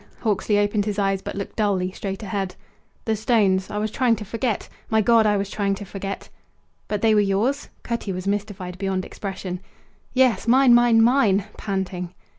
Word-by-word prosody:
Hawksley 210 -1 +1
opened 205 0 +1
his 210 -1 -2
eyes, 195 -1 +1
but - - -6
looked 200 0 -6
dully 195 -4 +1
straight 195 +2 -5
ahead. 195 -2 -3 0.5
"The 220 -2 +1
stones! 205 -4 +2
I 210 - -4
was 210 0 -1
trying 245 -2 +2
to 210 0 -7
forget! 230 +1 -2 0.2
My 220 - +3
God, 225 0 +4
I 205 -1 +3
was 200 0 -1
trying 200 -1 -1
to 205 - -8
forget!" 195 +1 -6 0.6
"But 210 0 -3
they 220 -1 +5
were 210 - +5
yours?" 210 +8 0
Cutty 235 -4 -3
was 185 0 -5
mystified 200 -3 -3
beyond 190 -1 -1
expression. 190 -2 -5 0.5
"Yes, 255 -3 +2
mine, 255 +1 +6
mine, 240 -2 +6
mine!" 225 -6 +3
panting. 185 -3 -4
205 Hz, 180 wpm, -23 LUFS, 195-225 Hz, 0.6 s, mine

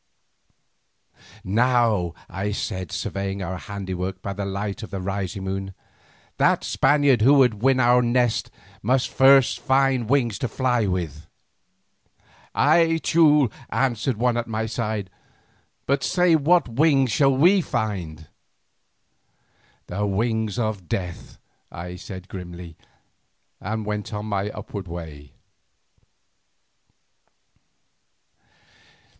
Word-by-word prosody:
"Now," 115 -4 +1
I 100 +3 -3
said, 95 -3 -4
surveying 100 0 -3
our 90 0 -4
handiwork 95 -2 -5
by 100 - -3
the 100 0 -4
light 100 +1 -4
of 110 - -8
the 100 - -5
rising 95 0 -4
moon, 95 0 -4 0.6
"that - - +2
Spaniard 145 -5 +3
who 135 +6 +6
would 125 -7 +3
win 130 +1 +3
our 125 0 +5
nest 120 -1 +1 0.3
must 125 +4 +1
find 135 -2 +3
wings 120 -6 +1
to 125 - -1
fly 120 -2 0
with." 85 -5 -4 1.3
"Ay, 165 +3 +3
Teule," 150 -7 +4 0.2
answered 125 -2 0
one 120 +1 +1
at 120 - -2
my 110 0 -2
side, 110 -4 -3 0.7
"but 140 0 0
say 180 -2 +3
what 160 +3 +3
wings 135 0 +2
shall 135 0 +3
we 180 +7 +5
find?" 95 - -4 1.6
"The 105 +3 -2
wings 110 +1 -1
of 110 -7 -3
Death," 90 -1 -5 0.3
I 90 +1 -7
said 95 0 -9
grimly, 90 -3 -9 0.8
and 110 +2 -4
went 105 0 -4
on 105 0 -4
my 100 -1 -2
upward 105 -3 -7
way. 80 -4 -9
110 Hz, 110 wpm, -23 LUFS, 95-130 Hz, 1.6 s, who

